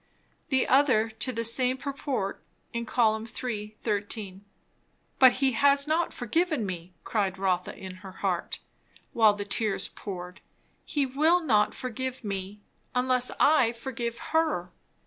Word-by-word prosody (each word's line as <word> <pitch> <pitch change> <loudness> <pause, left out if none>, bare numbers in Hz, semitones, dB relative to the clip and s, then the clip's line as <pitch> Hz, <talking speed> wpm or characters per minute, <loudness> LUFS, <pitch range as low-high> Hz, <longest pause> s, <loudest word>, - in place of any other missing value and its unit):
The 260 -2 +2
other 255 -5 +4
to 225 +4 -3
the 230 -1 -2
same 250 +3 +2
purport, 275 -7 -3 0.3
in 235 0 -3
Col. 220 -3 +2 0.2
iii. 215 -3 -4
13. 205 -2 -3 0.8
But 260 -2 +8
he 270 0 +2
has 280 +3 +4
not 320 +2 +1
forgiven 300 +1 0
me, 180 -2 -6
cried 195 -4 -1
Rotha 185 -2 -1
in 185 -1 -8
her 190 0 -10
heart, - - -2 0.6
while 220 -2 +5
the 205 0 -5
tears 205 -1 0
poured; 180 -2 -8 0.4
he 290 -2 0
will 305 +7 +3
not 215 -9 +2
forgive 255 0 -4
me, 200 0 -5 0.3
unless 250 0 +2
I 265 -6 +5
forgive 235 -1 -4 0.2
her. 310 - +1
230 Hz, 135 wpm, -28 LUFS, 205-265 Hz, 0.8 s, But